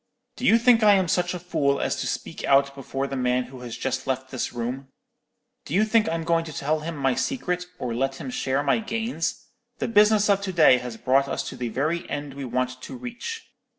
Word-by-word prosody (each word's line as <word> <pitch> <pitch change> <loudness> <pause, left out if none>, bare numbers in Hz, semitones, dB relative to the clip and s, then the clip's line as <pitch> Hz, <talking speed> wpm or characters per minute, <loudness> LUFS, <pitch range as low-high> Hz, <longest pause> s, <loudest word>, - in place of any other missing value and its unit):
'Do 250 - -1
you 225 - +7
think 235 0 +5
I 210 -2 +7
am 190 -2 +2
such 180 +1 0
a - - -4
fool 140 -6 0
as - - 0
to - - -2
speak - - -4
out 140 0 +4
before 135 0 -4
the 140 - -4
man 125 -1 +1
who 130 0 -11
has 120 -2 -7
just 130 - -3
left 130 0 -2
this 130 - -3
room? 125 +3 -4 0.8
Do 155 - -4
you 210 +3 +4
think 220 -2 +3
I'm 165 0 -2
going 165 0 +2
to 160 - -7
tell 150 +2 -1
him 160 +1 -5
my 135 -2 +2
secret, 180 - -2
or 120 -2 -3
let 135 +3 -1
him 255 - -6
share 140 - 0
my 140 +9 +2
gains? 225 -5 -3 0.3
The - - -2
business 210 -1 +5
of 200 -1 +3
to 195 -1 -3
day 155 -7 +6
has 125 -2 -7
brought 135 +3 +2
us - - -3
to - - -8
the 120 -1 -3
very 155 +8 -1
end 145 -1 -4
we 140 0 -6
want 125 +1 -2
to 255 - -8
reach. 255 - -7
145 Hz, 230 wpm, -25 LUFS, 130-200 Hz, 0.8 s, you